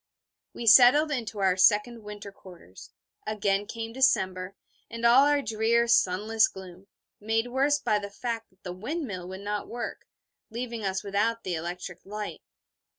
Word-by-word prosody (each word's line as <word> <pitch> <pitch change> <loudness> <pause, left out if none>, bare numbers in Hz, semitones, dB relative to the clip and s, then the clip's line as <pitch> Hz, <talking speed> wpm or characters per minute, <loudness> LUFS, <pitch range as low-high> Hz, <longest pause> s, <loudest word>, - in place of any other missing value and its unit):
We 235 - -6
settled 255 +7 +7
into 225 -6 -4
our 190 -2 +2
second 210 +4 +3
winter 210 -1 -9
quarters. 175 - -15 0.4
Again 205 -1 0
came 225 0 -6
December, 190 -8 +1 0.3
and 230 +1 -5
all 255 +4 +6
our 290 -1 +2
drear 225 +2 +1
sunless 220 +1 +3
gloom, 190 0 -12 0.3
made 225 +3 -1
worse 275 +3 +2
by 210 -6 0
the 200 0 -7
fact 225 +2 -5
that 185 - -35
the 180 - -6
windmill 210 - -5
would 190 +1 -8
not 205 0 -4
work, 240 0 -6 0.4
leaving 235 -1 -5
us 190 0 -2
without 210 +3 -1
the 185 - -3
electric 175 +2 -6
light. 210 +1 -7
210 Hz, 150 wpm, -27 LUFS, 190-235 Hz, 0.4 s, settled